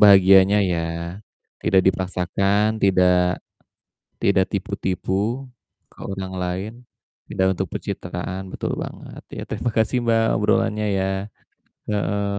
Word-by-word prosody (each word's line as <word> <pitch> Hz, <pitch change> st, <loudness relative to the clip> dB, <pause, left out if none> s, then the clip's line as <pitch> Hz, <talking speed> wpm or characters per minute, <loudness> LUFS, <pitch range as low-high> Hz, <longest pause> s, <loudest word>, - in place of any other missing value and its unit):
bahagianya 95 Hz, -1 st, +7 dB, 0.2 s
ya, 85 Hz, -, 0 dB, 0.8 s
tidak 95 Hz, -, +4 dB
dipaksakan, 95 Hz, +2 st, +1 dB, 0.2 s
tidak 90 Hz, -2 st, +4 dB, 1.0 s
tidak -, -, +3 dB
tipu-tipu 95 Hz, 0 st, -2 dB, 0.8 s
ke -, -, -21 dB
orang 95 Hz, -1 st, -5 dB
lain, 95 Hz, +4 st, -3 dB, 0.6 s
tidak 95 Hz, -, +1 dB
untuk 95 Hz, 0 st, -3 dB
pencitraan 95 Hz, -2 st, -4 dB
betul -, -, -3 dB
banget -, -, -9 dB, 0.2 s
ya -, -, -4 dB
terima 120 Hz, -, -2 dB
kasih, 110 Hz, +3 st, +2 dB
Mbak, 115 Hz, -1 st, +3 dB
obrolannya 105 Hz, +1 st, +1 dB
ya, 95 Hz, -, +1 dB, 0.9 s
heeh, 100 Hz, 0 st, 0 dB
95 Hz, 105 wpm, -22 LUFS, 95-105 Hz, 1.0 s, bahagianya